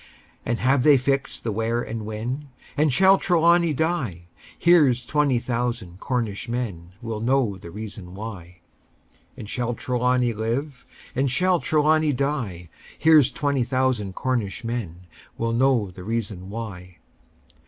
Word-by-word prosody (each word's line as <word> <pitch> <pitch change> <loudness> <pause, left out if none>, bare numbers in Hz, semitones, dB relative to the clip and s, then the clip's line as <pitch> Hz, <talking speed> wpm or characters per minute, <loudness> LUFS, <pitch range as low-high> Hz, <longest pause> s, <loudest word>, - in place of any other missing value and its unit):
And 120 - 0
have 130 +2 +2
they 145 +1 +6
fixed 135 +1 -1
the 115 - -1
where 115 +3 -1
and 110 -1 -5
when? 125 +7 -4 0.3
And 150 0 +2
shall 190 +7 +5
Trelawny 170 -1 +3
die? 145 - -1 0.3
Here's 145 -8 +4
twenty 145 -2 +2
thousand 120 -6 -3
Cornish 115 -4 -2
men 95 -8 -4
Will 115 -2 -4
know 120 -2 +1
the 85 -2 -11
reason 100 -2 -8
why! 90 -5 -8 0.8
And - - -8
shall 120 +2 -2
Trelawny 125 -1 +1
live? 125 +5 -3 0.3
Or 135 +2 +2
shall 180 +7 +2
Trelawny 155 0 +2
die? 125 - -2 0.3
Here's 155 -4 +5
twenty 140 -3 0
thousand 125 -6 0
Cornish 125 -3 -2
men 100 -7 -5 0.3
Will 115 0 -1
know 120 -5 +2
the 90 +1 -11
reason 105 -3 -4
why! 95 -5 -7
120 Hz, 135 wpm, -24 LUFS, 105-140 Hz, 0.8 s, they